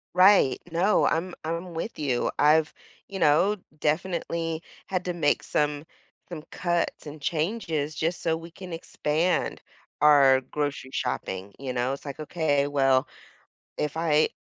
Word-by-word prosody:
Right, 185 -8 +6
no, 180 +6 +3
I'm 175 +2 0
I'm 170 +3 -4
with 165 +5 -5
you, 135 -5 0
I've, 155 +1 +4 0.3
you 195 - -6
know, 175 +6 +4
d 185 - -25 0.2
definitely 165 0 -1 0.3
had 185 -1 -2
to 180 - -1
make 155 -4 +1
some 150 0 -1 0.4
some 165 -4 -7
cuts 175 -3 -1
and 150 +1 -8
changes 155 -2 -1
just 165 +2 -1
so 160 -1 +1
we 165 +1 -9
can 180 +1 -8
expand 165 +1 -1 0.4
our 140 -3 +6
grocery 145 -1 -3
shopping, 100 -6 -3
you 135 -2 -4
know, 125 +1 0
it's 140 - -11
like, 140 +1 -7
"Okay, 150 -3 +1
well, 135 -1 +2 0.7
if 150 0 -2
I 155 -2 +3
155 Hz, 145 wpm, -26 LUFS, 145-170 Hz, 0.7 s, Right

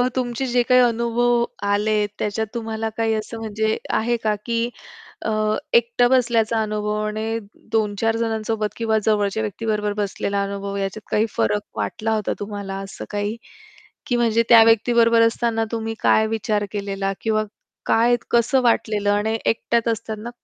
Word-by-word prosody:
तुमचे 250 0 -1
जे 245 -1 +4
काही 250 +1 +4
अनुभव 235 +1 +1 0.3
आलेत 210 0 +1
त्याच्यात 215 +1 -1
तुम्हाला 225 -1 -3
काही 225 -1 +1
असं 220 +1 -4
म्हणजे 220 0 -1 0.2
आहे 240 +2 0
का, 215 -1 +2
की 230 -1 0 0.7
अ, 220 - 0 0.4
एकटा 235 +1 +4
बसल्याचा 230 -3 +2
अनुभव 210 -1 -2
आणि 220 +1 -2 0.3
2-4 220 0 +1
जणांसोबत 220 -2 -2
किंवा 225 -1 +1
जवळच्या 210 0 +1
व्यक्तीबरोबर 210 -1 -2
बसलेला 200 0 -2
अनुभव 200 0 -4
याच्यात 195 +2 -4
काही 215 - +3
फरक 105 -2 +1 0.2
वाटला 215 - -2
होता 210 -2 -1
तुम्हाला 200 -1 -5
असं 195 - -8
काही? 205 +1 -2 0.7
की 245 - +1
म्हणजे 230 -1 +2
त्या 230 -1 +9
व्यक्ती 225 +1 +3
बरोबर 230 -1 +5
असताना 230 0 +1
तुम्ही 225 -1 -3
काय 220 - +4
विचार 215 -1 -1
केलेला 195 -1 -2
किंवा 215 -1 +1 0.4
काय 235 +2 +4 0.2
कसं 235 +3 +3
वाटलेलं 210 -3 +2
आणि 215 +2 +1
एकट्याच 235 +1 +1
असतात 220 -1 -4
ना, 230 +3 -6
220 Hz, 150 wpm, -22 LUFS, 210-230 Hz, 0.7 s, त्या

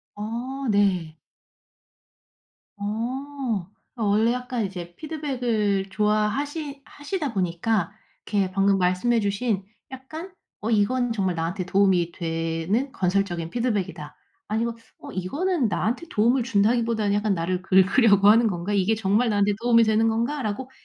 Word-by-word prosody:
어 240 +6 -4
네. 185 -6 +1 1.6
어. 230 -1 -3 0.2
어 230 - -3
원래 220 +4 +3
약간 250 -3 -2
이제 175 -2 -7
피드백을 245 -11 -1
좋아 210 0 +2
하시 285 +3 -4
하시다 290 -2 -4
보니까 185 +1 0 0.3
이렇게 200 -3 0
방금 195 0 +2
말씀해 185 +7 +2
주신 200 0 -1 0.3
약간 315 +8 -8 0.3
'어 225 +2 -2
이건 240 +3 +2
정말 190 -5 0
나한테 175 +3 -2
도움이 185 -3 +2
되는 165 +10 -2
건설적인 180 -3 -1
피드백이다.' 205 -10 -2 0.3
아니면 230 +2 -1 0.2
'어 - - -10
이거는 280 - -1
나한테 225 - -1
도움을 235 +4 +2
준다기보다는 225 -1 +1
약간 205 -1 +1
나를 180 +2 -2
긁으려고 200 +2 +5
하는 225 +1 +6
건가? 185 +1 -2
이게 200 +3 +2
정말 215 +3 +1
나한테 205 0 +2
도움이 235 -1 +5
되는 220 +1 +3
건가?'라고 240 +1 -2
210 Hz, 300 characters per minute, -24 LUFS, 190-245 Hz, 1.6 s, 하는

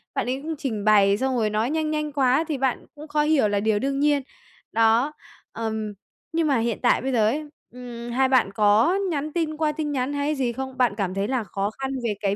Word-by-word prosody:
bạn - - 0
ấy 265 +2 -2
cũng 320 +2 -4
trình 220 -8 -3
bày 200 -2 +5
xong 265 +2 0
rồi 215 -2 +1
nói 215 +3 0
nhanh 310 0 -1
nhanh 300 -1 -2
quá 275 +1 +2
thì 305 -4 -2
bạn 265 -1 -1
cũng 300 +1 -10
khó 300 0 +1
hiểu 300 -7 +3
là 205 -1 0
điều 215 0 +1
đương 275 +2 -1
nhiên. 290 -1 +3 0.5
Đó, 230 +6 +3 0.4
ừm, 220 -2 -3 0.4
nhưng 325 -1 +1
mà 275 -3 +3
hiện 230 -1 -1
tại 245 - +3
bây 265 - -2
giờ 220 -4 +3
ấy, 300 +6 -1 0.2
ừm, 240 -1 -8
hai 260 +2 +2
bạn 255 -7 +3
có 215 - +4 0.2
nhắn 300 0 -3
tin 315 -3 -1
qua 310 -1 +1
tin 300 -1 -3
nhắn 265 0 -1
hay 285 +1 -1
gì 250 -4 -1
không? 265 0 -6
Bạn 245 -5 +3
cảm 190 -3 -1
thấy 195 +2 -1
là 255 -3 -1
khó 200 0 -2
khăn 270 0 -2
về 230 -3 0
cái 200 -1 +1
260 Hz, 240 wpm, -24 LUFS, 220-295 Hz, 0.5 s, bày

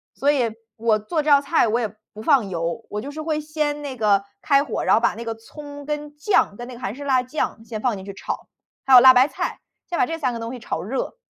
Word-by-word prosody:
所 285 +2 +2
以 240 -6 0 0.2
我 220 -1 +2
做 305 +9 -1
这 305 - 0
道 280 -1 +7
菜 280 -4 +2
我 225 +2 +1
也 220 -1 -3 0.2
不 215 - -9
放 255 -7 +3
油， 170 +5 -3
我 210 0 -4
就 285 - -7
是 310 +1 -6
会 310 -1 -1
先 300 -1 -2
那 275 -3 -6
个 205 -3 +3 0.2
开 280 -1 +4
火， 275 - -3
然 - - +5
后 225 - +2
把 235 - +2
那 230 - -7
个 225 0 -3
葱 285 +5 -11
跟 295 0 -4
酱 300 - +2
跟 240 +2 -8
那 255 - -8
个 240 - -10
韩 210 -1 -4
式 285 - -8
辣 260 -2 +3
酱 250 -4 -3
先 215 -2 -6
放 245 -5 0
进 190 - -9
去 200 - -7
炒， 195 - -5 0.4
还 270 - +3
有 250 - +11
辣 260 0 +10
白 255 +2 +5
菜， - - -4 0.3
先 350 - -2
把 375 - +4
这 325 -1 -4
3 265 -6 0
个 230 - -5
东 230 +2 -5
西 250 - -7
炒 165 - -4
热。 260 - -4
255 Hz, 285 characters per minute, -23 LUFS, 225-295 Hz, 0.4 s, 有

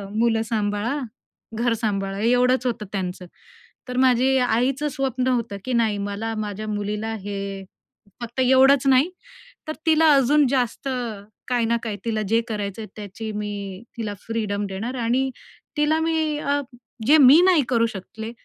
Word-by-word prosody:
मुलं 225 0 +2
सांभाळा, 215 +5 -1 0.6
घर 240 -2 +2
सांभाळा 200 -3 -2
एवढंच 250 +2 +2
होतं 230 -4 -2
त्यांचं. 185 -2 -4 0.6
तर 250 - -4
माझी 260 +1 +4
आईचं 250 +5 +1
स्वप्न 265 -3 -2
होतं 235 -5 -1
की 255 - -2
नाही, 225 -3 +2
मला 205 +3 -3
माझ्या 215 0 -4
मुलीला 210 +1 -3
हे 195 -1 -5 0.6
फक्त 240 +2 -6
एवढंच 265 +1 +5
नाही 270 +6 +4 0.6
तर 310 - -2
तिला 320 0 +5
अजून 280 +2 +4
जास्त 255 0 -1 0.6
काही 245 -2 +1
ना 235 +1 +1
काही 215 -3 -3
तिला 220 -2 -1
जे 225 +1 +4
करायचंय 210 -1 -4
त्याची 215 +1 -7
मी 200 -2 -5 0.2
तिला 215 -3 -3
फ्रीडम 210 -3 -2
देणार 220 +7 -4
आणि 250 +3 +1 0.5
तिला 305 +2 +2
मी 320 -2 0
अ, 285 0 0 0.5
जे 305 +3 +7
मी 290 +3 +8
नाही 345 -7 +5
करू 230 -2 +3
शकले 220 +4 -7
230 Hz, 145 wpm, -23 LUFS, 210-265 Hz, 0.6 s, मी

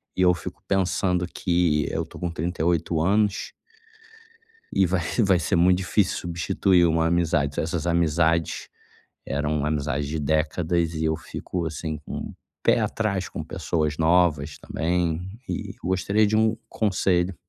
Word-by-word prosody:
E 95 - 0
eu 90 -1 +6
fico 85 - -8
pensando 90 -2 +1
que 85 -5 +1
eu - - -2
tô - - -13
com 85 -1 -2
38 85 0 0
anos 100 +3 +1 1.2
e 95 - +4
vai 90 0 0 0.2
vai 95 -5 +4
ser 80 - 0
muito 90 +2 +4
difícil 95 0 +1
substituir 85 +1 +2
uma 80 0 +2
amizade. 80 -4 +1
Essas 85 0 -2
amizades, 85 -1 +1 0.6
eram 75 +1 -1
amizades 75 -1 -1
de 75 +2 -3
décadas 80 +3 0
e 80 0 -1
eu 80 - +1
fico 85 +2 -5
assim 80 -1 -4
com - - -6 0.3
pé - - +4
atrás 100 -4 -1
com - - -5
pessoas 75 -3 -2
novas 80 -3 +2
também 85 -1 -1 0.3
e - - -4
eu - - -9
gostaria 100 +3 +2
de 110 - +1
um 110 +1 +3
conselho. 95 -3 +1
85 Hz, 145 wpm, -25 LUFS, 80-90 Hz, 1.2 s, eu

